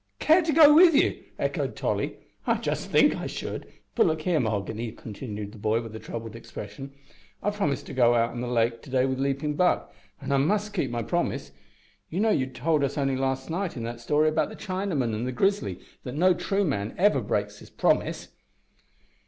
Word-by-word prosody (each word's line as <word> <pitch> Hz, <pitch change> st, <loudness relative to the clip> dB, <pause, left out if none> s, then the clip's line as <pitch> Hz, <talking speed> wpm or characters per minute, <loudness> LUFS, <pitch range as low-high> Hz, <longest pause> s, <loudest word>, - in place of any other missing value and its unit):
"Care 320 Hz, +4 st, +5 dB
to 325 Hz, -1 st, 0 dB
go 300 Hz, -1 st, +8 dB
with 330 Hz, 0 st, +7 dB
ye!" -, -, +2 dB
echoed -, -, -2 dB
Tolly, -, -, -2 dB, 0.3 s
"I -, -, +4 dB
just -, -, -3 dB
think -, -, +5 dB
I -, -, -4 dB
should. -, -, -6 dB, 0.2 s
But, -, -, +4 dB
look 160 Hz, -1 st, -1 dB
here, 175 Hz, -3 st, +2 dB
Mahoghany," 110 Hz, 0 st, -2 dB
continued 105 Hz, -2 st, -7 dB
the 110 Hz, -, -13 dB
boy, 110 Hz, +2 st, +1 dB
with 110 Hz, -1 st, -9 dB
a -, -, -6 dB
troubled 115 Hz, -1 st, -7 dB
expression, 135 Hz, +3 st, -8 dB, 0.5 s
"I've 205 Hz, 0 st, 0 dB
promised 145 Hz, -, -1 dB
to -, -, -8 dB
go 120 Hz, -2 st, +4 dB
out 115 Hz, 0 st, +2 dB
on 120 Hz, -, -5 dB
the 125 Hz, -, -3 dB
lake 115 Hz, -1 st, +1 dB
to 145 Hz, -, -13 dB
day 130 Hz, 0 st, +2 dB
wi' 130 Hz, -, 0 dB
Leaping 140 Hz, +2 st, -1 dB
Buck, 180 Hz, +4 st, +1 dB, 0.3 s
an' 140 Hz, -1 st, -5 dB
I 140 Hz, -, +3 dB
must 205 Hz, +9 st, +1 dB
keep 170 Hz, -10 st, -1 dB
my 120 Hz, -1 st, -2 dB
promise. -, -, -2 dB, 0.6 s
You 175 Hz, -, -3 dB
know 220 Hz, +1 st, +3 dB
you 130 Hz, -9 st, +1 dB
told 150 Hz, +3 st, 0 dB
us 140 Hz, +1 st, -1 dB
only 135 Hz, -2 st, +1 dB
last 130 Hz, 0 st, -1 dB
night 180 Hz, -3 st, -2 dB
in 115 Hz, -, -4 dB
that 120 Hz, +1 st, -5 dB
story 150 Hz, +5 st, +2 dB
about 155 Hz, -, +1 dB
the 220 Hz, -, -9 dB
Chinaman 185 Hz, -, -2 dB
and 115 Hz, +4 st, -2 dB
the -, -, -1 dB
grizzly 160 Hz, -, 0 dB, 0.2 s
that 125 Hz, -, -6 dB
no 180 Hz, +4 st, +4 dB
true 195 Hz, +3 st, 0 dB
man 105 Hz, -, -2 dB
ever 180 Hz, -8 st, +3 dB
breaks 105 Hz, -1 st, -2 dB
his -, -, -14 dB
promise." -, -, 0 dB
135 Hz, 210 wpm, -26 LUFS, 115-180 Hz, 0.6 s, go